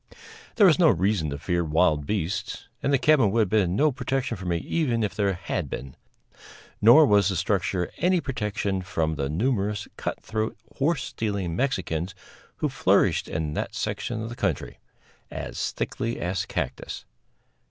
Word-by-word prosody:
There 210 - +6
was 180 -2 +5
no 165 -3 +6
reason 95 -4 +1
to 70 - -4
fear 85 +4 0
wild 75 -2 +2
beasts 100 -1 -3
and 140 - 0
the 140 - +5
cabin 135 -5 +4
would 115 +3 +2
have 105 - +1
been 95 -4 +2
no 150 +6 +3
protection 130 +1 -2
for 95 -1 -7
me 85 -1 +1
even 120 - 0
if 105 - -1
there 100 -2 +1
had 85 -3 -3
been; 65 0 -6 0.9
nor 120 +9 +8
was 100 -6 +4
the 95 - -1
structure 90 0 0
any 180 0 +3
protection 105 - -2
from 80 -3 -1
the 70 -2 -2
numerous 105 - 0
cut - - -3
throat, 110 0 -3 0.2
horse 145 0 +1
stealing 100 -6 -3
Mexicans 95 - -1 0.4
who - - -1
flourished - - +2
in 75 -1 -3
that - - -3
section 110 -2 -3
of 115 - -5
the 120 - -7
country - - -2 0.5
as - - -4
thickly 115 +1 -3
as 90 +2 -2
cactus. - - -4
100 Hz, 165 wpm, -26 LUFS, 85-120 Hz, 0.9 s, nor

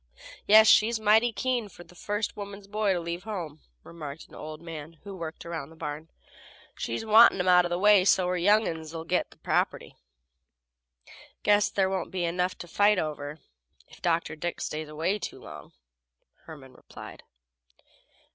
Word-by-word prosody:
"Yes, 220 +1 +8
she's 220 +1 +5
mighty 220 +3 +4
keen 240 -2 -2
fer 175 - -13
the 180 - -19
first 205 +4 -3
woman's 200 -1 -8
boys 205 -1 0
to - - -1
leave 170 +1 -5
home," 175 -8 -6 0.2
remarked 155 -2 -9
an - - -22
old 155 0 -8
man 165 -1 -9
who 200 -1 -8
worked 165 -3 -7
around 160 -4 -6
the 165 - -16
barn. 155 +1 -6 0.7
"She's 115 - -4
wantin' 220 -1 +6
'em 180 - -1
out 180 -1 +6
of - - -3
the 175 - -1
way 205 0 +5
so 185 -1 +3
her 180 - 0
young 205 +5 +3
uns 160 -1 -6
'll 160 - -5
git 180 +2 -1
the - - -20
property." - - -2 1.5
"Guess 205 0 +3
there 195 -1 +1
won't 190 -2 -3
be 185 -2 -2
enough 180 +2 -1
to 175 - -9
fight 205 +3 +3
over 150 -2 -4 0.5
if - - -17
Dr. 170 -2 0
Dick 175 +3 -4
stays 155 0 -5
away 165 +7 -1
long," - - -12 0.7
Herman 135 -5 -12
replied. - - -12
180 Hz, 170 wpm, -27 LUFS, 160-205 Hz, 1.5 s, Yes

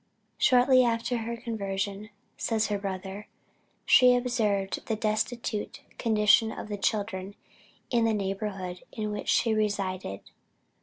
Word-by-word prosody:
"Shortly 255 0 +5
after 235 +1 0
her 235 +1 -4
conversion," 200 -2 -4 0.3
says 220 -2 0
her 205 -1 -1
brother, 195 +1 -5 0.6
"she 250 -1 +7
observed 215 -6 0
the 225 - 0
destitute 215 +1 -2 0.2
condition 220 0 +4
of 215 - -7
the 205 - -3
children 200 -2 -2 0.6
in 235 -2 +3
the 225 - +2
neighborhood 195 -2 -4
in 215 -2 -3
which 210 - -4
she 225 - +3
resided. 195 - -2
215 Hz, 120 wpm, -28 LUFS, 195-230 Hz, 0.6 s, she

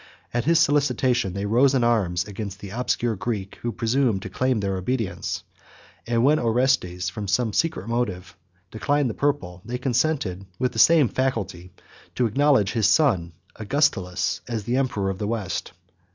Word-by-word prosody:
At 120 -1 0
his 165 +1 +4
solicitation 135 - +2
they 100 +1 -3
rose 125 +6 +3
in 125 - +2
arms 100 -7 +1
against 100 -1 -6
the 100 -2 -9
obscure 120 0 -1
Greek, 105 -1 -4
who 120 - -3
presumed 115 -2 0
to 100 - -7
claim 130 +2 0
their 100 -1 -1
obedience; 95 -2 -3 0.6
and 115 0 +1
when 150 +3 +4
Orestes, 115 -7 +1
from 100 +3 -5
some 110 +2 +1
secret 165 - -1
motive, 100 -7 -2 0.4
declined 140 +3 0
the - - -7
purple, 140 -12 -2
they 120 +3 -4
consented, 125 - -1
with 125 - 0
the - - -4
same 160 -5 +6
facility, 105 -9 -2 0.4
to 125 - +2
acknowledge 130 -3 +3
his 110 -4 +2
son 100 - +2 0.2
Augustulus 105 -6 0
as 115 -4 -3
the 120 +5 -1
emperor 105 -8 0
of 95 - -7
the 105 - -2
West. 110 -4 -3
115 Hz, 165 wpm, -24 LUFS, 95-130 Hz, 0.6 s, same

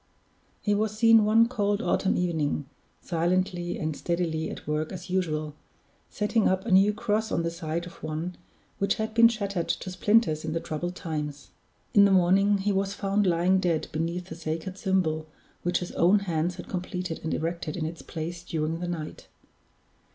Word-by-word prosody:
He 205 - +1
was 215 +1 0
seen 225 -1 +6
one 225 +2 +5
cold 205 -4 0
autumn 195 -4 +1
evening, 160 -5 0 0.4
silently 175 +1 0
and 155 -1 -2
steadily 165 -2 -1
at - - -8
work 150 +1 -1
as 180 -1 -7
usual, 155 -5 -1 0.6
setting 210 +1 +1
up 190 +1 0
a 230 - -2
new 195 +2 +6
cross 220 0 -1
on 170 - 0
the 170 - -1
site 165 0 -3
of 175 - -12
one 160 +3 -4 0.4
which 200 - +2
had 220 -1 -3
been 230 +1 +8
shattered 200 -6 -2
to 185 - -2
splinters 180 -4 +2
in 155 -1 -3
the 165 - 0
troubled 175 +3 -4
times. 150 -4 -5 0.4
In 200 -1 +7
the 200 - +4
morning 195 +2 +4
he 200 +1 0
was 195 0 0
found 200 0 +1
lying 180 +2 +3
dead 170 -4 0
beneath 170 +3 -3
the 160 - -6
sacred 165 +3 -4
symbol 160 -5 0 0.3
which 175 +1 +1
his 180 - -5
own 190 +4 +4
hands 170 -2 -1
had 180 - -9
completed 180 -2 -4
and 160 - -2
erected 165 -1 -3
in 160 - -2
its 165 +1 -6
place 170 +1 -6
during 160 -1 -2
the 175 - -3
night. 165 -3 -6
180 Hz, 180 wpm, -27 LUFS, 160-200 Hz, 0.6 s, been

